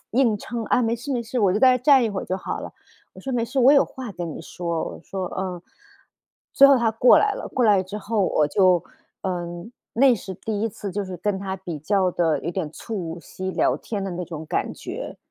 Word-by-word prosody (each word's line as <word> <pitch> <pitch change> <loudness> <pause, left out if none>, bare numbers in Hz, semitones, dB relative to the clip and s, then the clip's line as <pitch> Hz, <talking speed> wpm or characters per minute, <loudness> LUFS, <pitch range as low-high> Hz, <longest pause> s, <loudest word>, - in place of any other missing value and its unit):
硬 235 -3 +3
撑， 230 +2 -5
“啊， 250 - +2
没 230 0 +1
事 255 +4 -5
没 240 - -1
事， 235 +2 -4
我 200 -3 +4
就 205 - +1
在 260 - +7
那 250 - +1
站 265 0 +5
一 225 - 0
会 195 -2 -3
儿 - - -6
就 185 - -1
好 - - -5
了。” - - -7 0.4
我 - - -12
说： 270 - -5
“没 240 -2 +1
事， 255 +3 -1
我 260 +3 +7
有 285 - +6
话 260 -4 -8
跟 175 -2 -5
你 - - -7
说。” 170 -1 -3
我 - - -8
说： 190 -1 -4
“嗯。” 180 -2 -4 0.9
最 275 - +8
后 275 - +7
她 235 -2 +2
过 225 +3 +6
来 420 - +3
了， - - -6
过 250 - +2
来 205 -4 +5
之 190 +3 -7
后 210 -1 0
我 150 - +2
就 180 +1 +4 0.4
嗯， 175 +1 -4 0.2
那 260 +2 +5
是 190 -3 -7
第 210 +3 -4
1 225 - +1
次 200 0 -7
就 205 +1 -2
是 185 -1 -6
跟 200 +1 -1
她 190 -1 -4
比 175 -4 -6
较 185 +4 +1
的 165 -3 +1
有 - - -3
点 175 -3 -3
促 175 -7 -5
膝 185 +2 -6
聊 - - +2
天 205 -3 -5
的 195 - -3
那 180 0 -4
种 160 -2 -7
感 - - -2
觉。 - - -7
200 Hz, 260 characters per minute, -23 LUFS, 180-235 Hz, 0.9 s, 最